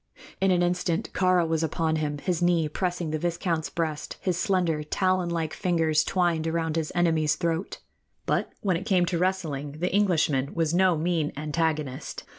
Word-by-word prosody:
In 195 - +3
an 175 -1 +3
instant 175 -1 -1
Kāra 185 -2 +3
was 160 -1 0
upon 160 0 0
him, 150 -1 -2
his 175 +3 -2
knee 175 -3 +3
pressing 175 0 -2
the 155 - -1
viscount's 170 -1 -1
breast, 155 -3 -3
his 180 -2 -1
slender, 175 -4 +1
talon 185 +3 0
like 165 -2 -2
fingers 165 -5 +1
twined 170 -3 0
around 160 -1 -1
his 160 -2 -1
enemy's 160 -3 +2
throat. 170 +1 -2 0.5
But - - 0
when 185 -4 +1
it 195 +5 -7
came 185 -4 +3
to 170 -1 -1
wrestling, 160 -7 -1
the 175 +5 -2
Englishman 160 -9 +2
was 165 -1 +1
no 180 -1 +4
mean 160 -2 0
antagonist. 150 -2 -2
165 Hz, 170 wpm, -26 LUFS, 155-180 Hz, 0.5 s, no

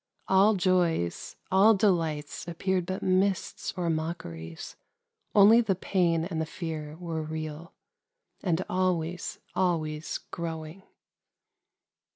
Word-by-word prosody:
All 195 +3 +5
joys, 175 - +1 0.2
all 200 +4 +6
delights 165 -8 0
ap 170 -1 -6
peared 185 -1 0
but 185 0 -3
mists 185 +1 0
or 175 -1 -1
mockeries: 155 - -4 0.6
only 215 +3 +8
the 200 -5 +1
pain 170 -3 +1
and 165 -3 -3
the - - -1
fear 155 -3 -5
were 165 -2 -4
real, 155 +1 -6 0.3
— 485 0 -48
and 180 -1 0
always, 180 -2 -1 0.2
always 160 -4 0
growing. 165 +1 -5
170 Hz, 115 wpm, -28 LUFS, 160-190 Hz, 0.6 s, only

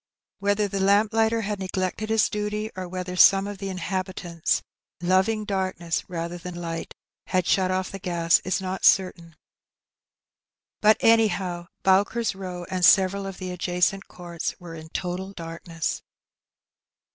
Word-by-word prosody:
Whether 205 +1 +1
the 195 0 -3
lamplighter 220 +3 +3
had 205 -1 -3
neglected 190 +3 -3
his 220 -1 +3
duty, 210 +1 -3
or 185 -1 -5
whether 180 0 -5
some 195 +1 +6
of 205 -1 -6
the 195 -1 -4
inhabitants, 185 -2 -2 0.2
" - - -69
loving 190 +5 +2
darkness 185 -4 -2
rather 170 0 -4
than 180 0 -7
Kght," 165 -1 -5 0.4
had 185 -2 +1
shut 185 0 +2
off^ 185 0 -1
the 195 - -7
gas, 170 -2 +2
is 185 - -1
not 190 0 -4
certain; 170 -4 +3 1.5
but 215 0 +6
anyhow 190 -6 +2 0.2
Bowker's 205 +5 +2
Row 180 -2 -6
and 185 -1 -2
several 195 +2 +5
of 195 -1 -7
the 185 -1 -5
adjacent 180 +2 0
courts 175 -2 -5
we 170 -2 -9
e - - -8
in 160 0 -12
total 185 +3 -4
darkness. 165 -1 -4
185 Hz, 145 wpm, -25 LUFS, 175-200 Hz, 1.5 s, some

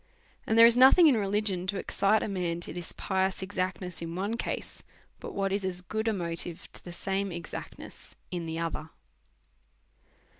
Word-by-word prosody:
And 220 - +2
there 230 - +10
is 235 0 +6
nothing 265 +8 +8
in 290 -5 +6
religion 200 -3 +1
to 200 +1 -1
ex - - -5
cite 210 +2 +3
a - - -2
man 180 -4 -2
to - - -5
this 175 -1 -5
pious 190 0 -1
exactness 185 -2 -3
in 165 0 -5
one 200 +5 -2
case, - - -4 0.4
but - - -8
what 195 -1 0
is 200 0 -1
as 180 -1 -3
good 220 +5 -3
a - - +3
motive 170 -2 -1
to - - -6
the 175 - -8
same 195 +2 -2
exactness 170 0 -9 0.2
in 175 -2 -4
the 160 0 -4
other. 165 -1 -3
190 Hz, 185 wpm, -29 LUFS, 175-205 Hz, 0.4 s, there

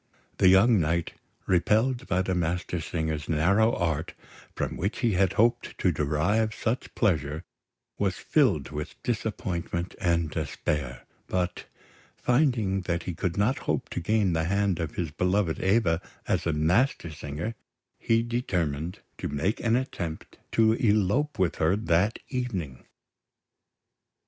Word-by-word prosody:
The - - +6
young 100 +4 +6
knight, 85 +1 0 0.3
repelled 110 +8 +2
by 90 +1 +1
the 95 - -1
Mastersingers' 80 -3 -2
narrow 100 +9 +3
art, 80 -1 -2 0.4
from - - -2
which 100 +7 -2
he 120 - +3
had 95 0 +2
hoped 120 +2 +1
to 90 - +2
derive 85 +10 +1
such 120 +3 -2
pleasure, 80 - 0 0.6
was - - 0
filled - - +2
with 75 +2 -5
disappointment 90 -6 -2
and 85 -3 +1
despair; 65 -5 -3 0.2
but, 90 0 -2 0.5
finding 120 -8 +2
that 85 -1 0
he 90 - -4
could 90 +2 -2
not 110 +7 +2
hope - - 0
to - - -3
gain 100 +1 +1
the 80 0 0
hand 100 -1 +1
of 85 -2 -3
his 85 -4 -2
beloved 90 +1 0
Eva 95 -4 +2 0.3
as - - 0
a - - +2
Mastersinger, 80 - 0 0.5
he 115 0 +2
determined 90 - -2 0.2
to - - -2
make 75 +9 -1
an 115 0 +2
attempt 90 -11 -4
to 110 -1 +4
elope 110 +6 +1
with 95 -2 +1
her 80 +4 +3
that 100 +1 +1
evening. 95 - -4
90 Hz, 135 wpm, -27 LUFS, 80-110 Hz, 0.6 s, The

